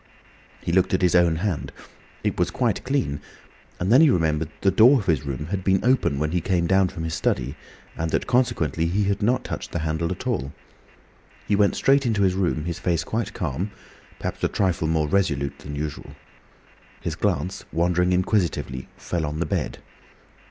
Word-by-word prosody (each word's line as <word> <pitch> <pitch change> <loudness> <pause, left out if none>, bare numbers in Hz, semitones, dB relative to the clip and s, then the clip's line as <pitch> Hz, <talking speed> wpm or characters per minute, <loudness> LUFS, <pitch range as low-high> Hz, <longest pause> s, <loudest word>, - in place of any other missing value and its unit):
He - - -1
looked 95 +1 +3
at 95 - -1
his 90 - +4
own 85 -2 +4
hand. 90 -1 -2 0.5
It - - -1
was - - +2
quite - - -1
clean, 125 - -1 0.6
and 90 +4 0
then 130 +5 +7
he 160 - +7
remembered 80 - +1
that - - -27
the 95 -1 +2
door 125 +7 +7
of 105 - -5
his 75 -6 0
room 75 +3 -4
had 95 -2 -2
been 95 0 +3
open 125 - +2
when 75 +2 -1
he 90 0 0
came 90 -1 +1
down 95 +1 +3
from 85 -3 -6
his 80 0 -3
study, - - -1 0.4
and 80 0 -2
that - - 0
consequently 120 - +1
he 100 +5 +1
had 100 +1 0
not 125 +4 +2
touched - - -6
the - - 0
handle 80 +1 -1
at - - -5
all. 70 +4 -2 0.9
He 105 - +3
went 100 0 +3
straight 135 +1 +3
into 105 -3 +1
his 95 -1 +3
room, 90 -5 0
his 85 0 -3
face 85 -3 0
quite 115 +6 -3
calm—perhaps 85 +5 -6
a - - +4
trifle 90 -5 0
more 80 -1 +1
resolute 75 -6 0
than 75 0 -7
usual. 75 0 -5 0.9
His 85 - -3
glance, 90 0 -1
wandering 90 +2 +2
inquisitively, 90 - 0
fell 85 -2 -3
on 75 +1 -3
the 85 - 0
bed. - - -2
90 Hz, 190 wpm, -24 LUFS, 80-100 Hz, 0.9 s, then